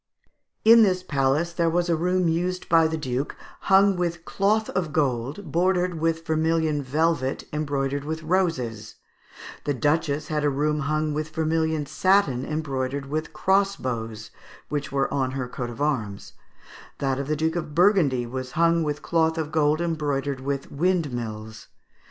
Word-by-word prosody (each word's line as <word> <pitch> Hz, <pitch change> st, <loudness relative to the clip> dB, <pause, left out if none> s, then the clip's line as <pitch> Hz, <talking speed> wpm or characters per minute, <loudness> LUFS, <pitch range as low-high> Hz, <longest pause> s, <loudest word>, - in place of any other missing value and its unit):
] -, -, -51 dB
In 230 Hz, -, +8 dB
this 185 Hz, -4 st, +3 dB
palace 145 Hz, +2 st, 0 dB
there 170 Hz, -1 st, +1 dB
was 175 Hz, +1 st, +1 dB
a 170 Hz, -, +2 dB
room 180 Hz, +2 st, +1 dB
used 180 Hz, +3 st, -1 dB
by 165 Hz, -1 st, +5 dB
the 160 Hz, 0 st, -2 dB
duke, 130 Hz, -1 st, -3 dB, 0.2 s
hung 195 Hz, 0 st, +4 dB
with 175 Hz, -2 st, -2 dB
cloth 215 Hz, +2 st, +1 dB
of 175 Hz, -5 st, -2 dB
gold, 140 Hz, +3 st, -1 dB
bordered 180 Hz, 0 st, +1 dB
with 165 Hz, 0 st, 0 dB
vermilion 160 Hz, -1 st, +1 dB
velvet 140 Hz, 0 st, 0 dB
embroidered 140 Hz, -2 st, -1 dB
with 160 Hz, +2 st, -4 dB
roses; 155 Hz, -, -1 dB, 0.7 s
the 145 Hz, -, 0 dB
duchess 150 Hz, +1 st, 0 dB
had 150 Hz, -1 st, -1 dB
a 145 Hz, -, +3 dB
room 150 Hz, +2 st, 0 dB
hung 155 Hz, +1 st, -1 dB
with 155 Hz, +1 st, -3 dB
vermilion 160 Hz, -1 st, 0 dB
satin 150 Hz, -3 st, +2 dB
embroidered 140 Hz, -2 st, -3 dB
with 155 Hz, +1 st, -2 dB
crossbows, 130 Hz, -, -1 dB, 0.4 s
which 145 Hz, -1 st, -3 dB
were 135 Hz, 0 st, 0 dB
on 130 Hz, -2 st, 0 dB
her 130 Hz, -2 st, -3 dB
coat 125 Hz, 0 st, -5 dB
of 120 Hz, -, -9 dB
arms; 115 Hz, -10 st, -2 dB, 0.6 s
that 135 Hz, -1 st, -1 dB
of 140 Hz, -, -3 dB
the 155 Hz, -, 0 dB
Duke 160 Hz, +2 st, 0 dB
of 155 Hz, -3 st, -4 dB
Burgundy 170 Hz, -, +3 dB
was 130 Hz, +1 st, -6 dB
hung 170 Hz, 0 st, +3 dB
with 150 Hz, -2 st, -2 dB
cloth 160 Hz, -1 st, +1 dB
of 155 Hz, -2 st, -3 dB
gold 155 Hz, 0 st, +2 dB
embroidered 145 Hz, -5 st, -1 dB
with 140 Hz, +1 st, -4 dB
windmills. 120 Hz, -10 st, -2 dB
155 Hz, 155 wpm, -25 LUFS, 135-170 Hz, 0.7 s, In